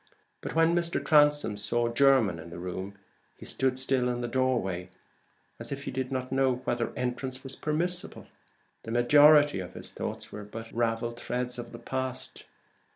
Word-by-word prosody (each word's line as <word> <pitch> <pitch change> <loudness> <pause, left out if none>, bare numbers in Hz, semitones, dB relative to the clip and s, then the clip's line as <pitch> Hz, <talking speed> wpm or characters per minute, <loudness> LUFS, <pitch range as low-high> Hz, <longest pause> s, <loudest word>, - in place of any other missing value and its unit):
But - - -6
when 165 +1 +4
Mr. 170 -1 0
Transome 145 -8 +4
saw 120 +3 0
Jermyn 120 -7 +3
in 85 - -9
the 85 - -9
room 95 +3 -5 0.4
he - - -11
stood 130 -1 0
still 130 -1 +1
in 120 0 -2
the 120 - -2
doorway, 115 -8 0 0.7
as - - -4
if 140 0 -4
he - - -4
did 130 0 -3
not 130 -1 -3
know 135 -1 +2
whether 120 -1 -1
entrance 130 +1 -3
was 135 -1 -5
permissible. 175 +4 -1 0.6
The - - -9
majority 145 +3 +6
of 90 0 -7
his - - -6
thoughts - - -5
were 105 - -7
but 115 +2 -9
ravelled 115 0 -1
threads 125 0 -3
of 120 0 -7
the 115 - -8
past. 130 +1 -4
125 Hz, 170 wpm, -28 LUFS, 115-135 Hz, 0.7 s, majority